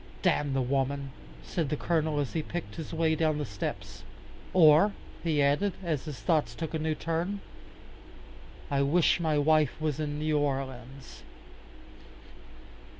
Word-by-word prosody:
"Damn 145 -2 +2
the 135 -1 +1
woman," 135 +1 -1 0.3
said 160 -5 -2
the 150 - -1
Colonel 160 -2 0
as 140 -4 -2
he 160 - 0
picked 155 -9 -6
his 160 - -6
way 160 -1 +1
down 155 -1 +1
the 150 - -2
steps. 100 -3 -6 0.5
"Or," 170 +3 +6 0.3
he 155 -4 +2
added, 150 +8 +2
as 155 -6 -2
his 145 -7 -6
thoughts 120 -1 +1
took 160 +3 -5
a 160 - -1
new 155 0 -1
turn, 165 +6 -2 1.3
"I 140 -1 +2
wish 160 +6 +3
my 160 -3 +1
wife 155 -1 +3
was 155 -2 -1
in 145 -1 -2
New 155 0 +1
Orleans." 135 -2 -4
150 Hz, 150 wpm, -29 LUFS, 140-160 Hz, 1.3 s, Or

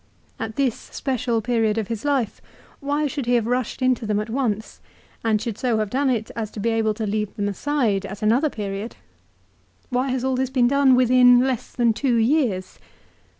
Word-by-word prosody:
At 220 -1 -4
this 265 -3 +1
special 245 -4 -2
period 225 -2 +1
of 220 -3 -1
his 230 -3 -4
life 275 -7 -1 0.4
why 290 +2 -1
should 280 -3 -3
he 245 - +3
have 235 -2 +1
rushed 245 +1 -2
into 255 -3 +1
them 210 -1 +1
at 210 +1 -4
once, 220 -4 -2 0.4
and 220 -2 +2
should 225 -1 -5
so 245 -3 +1
have 215 -2 -2
done 270 +1 +1
it 225 -4 -1
as 220 -2 -3
to - - -7
be 230 +3 0
able 220 -1 +1
to 220 0 -3
leave 210 0 -2
them 205 -2 -1
aside 210 -3 0
at 200 +2 -8
another 245 +8 +3
period? 205 -1 -5 1.0
Why 250 +2 0
has 255 -1 -1
all 265 0 +1
this 260 0 -1
been 255 -2 +3
done 275 0 +4
within 250 0 +6
less 260 -2 -2
than 235 -2 +2
two 250 +1 0
years 230 -6 +1
235 Hz, 195 wpm, -23 LUFS, 215-260 Hz, 1.0 s, within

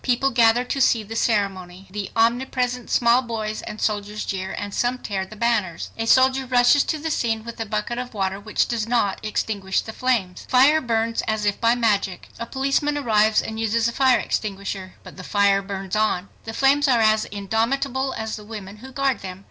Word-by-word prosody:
People 260 +2 +1
gather 235 0 +4
to 270 +2 -2
see 230 -3 +3
the 220 +2 -8
ceremony. 195 -5 -1
The 205 -1 -4
omnipresent 245 +1 0
small 235 +1 +4
boys 220 -3 -4
and 210 - -8
soldiers 210 0 -2
jeer, 190 0 -3
and 205 -1 -5
some 245 +1 0
tear 195 -5 -4
the 215 - -11
banners. 210 -7 -1
A 225 0 -3
soldier 260 +1 +4
rushes 250 +3 +4
to 315 - -1
the 315 +1 -3
scene 225 -5 -1
with 235 0 -9
a 225 - -3
bucket 215 +3 -2
of 250 -2 -7
water 195 -1 -1
which 210 +1 0
does 225 -2 -2
not 230 -5 0
extinguish 205 -2 -1
the 220 - -8
flames. 215 -9 -1
The - - -28
fire 280 +5 +5
burns 230 -2 0
as 220 -1 -1
if 205 -1 0
by 230 +1 +4
magic. 205 -6 0
A 235 - -4
policeman 275 +3 0
arrives 220 -5 +3
and 220 0 -5
uses 225 +1 +1
a - - -1
fire 260 -2 +4
extinguisher. 195 -3 -4
But - - -12
the 185 - -8
fire 200 0 +2
burns 195 0 -5
on! 210 -3 0 0.2
The 225 - -6
flames 280 +2 +3
are 245 -4 +3
as 215 0 +3
indomitable 245 +6 -1
as 220 -1 -4
the 210 - -10
women 210 -2 -9
who 260 +5 -11
guard 270 -1 0
them! 185 -1 -8
225 Hz, 205 wpm, -23 LUFS, 205-245 Hz, 0.2 s, fire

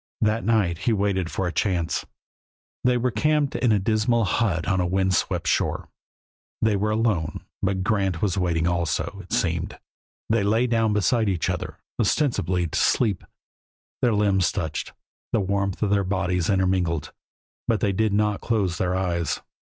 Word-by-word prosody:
That 110 +1 +1
night 100 -7 +1
he 115 +4 +1
waited 100 -4 0
for 95 - -2
a 90 - -1
chance. 90 -4 -1 0.8
They 125 0 +3
were 125 +1 0
camped 145 +6 +1
in 120 - +2
a 105 - +4
dismal 110 +3 +1
hut 90 -4 0
on 95 -2 +2
a - - +1
wind 95 +1 +1
swept - - 0
shore; - - 0 0.7
they 110 -2 +2
were 105 +2 0
alone. 105 -8 0 0.2
But 95 -1 0
Grant 95 -5 0
was 100 -2 0
waiting 85 -4 0
also, 85 -3 -1
it - - -17
seemed. - - -1 0.5
They 115 0 +2
lay 110 +5 +2
down 115 -3 +1
beside 110 +1 +2
each 90 -4 0
other, - - -5 0.2
ostensibly 105 - +1
to 80 - -2
sleep; 105 -7 +2 0.8
their 120 -3 +3
limbs 100 -3 +2
touched; 80 -6 -3 0.4
the 115 - +3
warmth 100 -1 -1
from 105 -2 0
their 100 -1 +3
bodies 90 -2 0
intermingled, 90 -6 0 0.5
but 115 -3 +2
they 100 +1 +1
did 110 +2 +1
not 105 0 +1
close 100 -7 0
their 90 0 0
eyes. 85 -3 -1
100 Hz, 165 wpm, -24 LUFS, 90-110 Hz, 0.8 s, a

